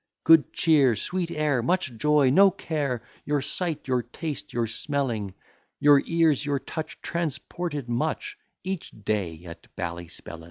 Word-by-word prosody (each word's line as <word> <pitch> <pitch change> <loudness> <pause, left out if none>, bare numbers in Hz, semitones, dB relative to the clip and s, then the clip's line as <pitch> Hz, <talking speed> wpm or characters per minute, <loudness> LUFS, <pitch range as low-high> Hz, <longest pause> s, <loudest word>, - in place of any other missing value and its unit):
Good 160 -3 +6
cheer, 145 -8 +4
sweet 175 - -2
air, 150 -6 +1
much 160 0 0
joy, 145 +1 +3
no 195 +7 +7
care, 145 -9 -3 0.2
Your 145 -2 0
sight, 170 -4 -3
your 125 -2 +2
taste, 150 +5 -6
your 120 -1 0
smelling, 115 -4 -2 0.4
Your 145 -1 +6
ears, 165 -4 +3
your 145 -1 0
touch, 160 +4 -6
transported 170 -3 -3
much 120 0 -2 0.3
Each 190 -2 -4
day 95 -6 -3
at 85 -1 -11
Ballyspellin. 85 -1 -6
140 Hz, 135 wpm, -26 LUFS, 115-160 Hz, 0.4 s, no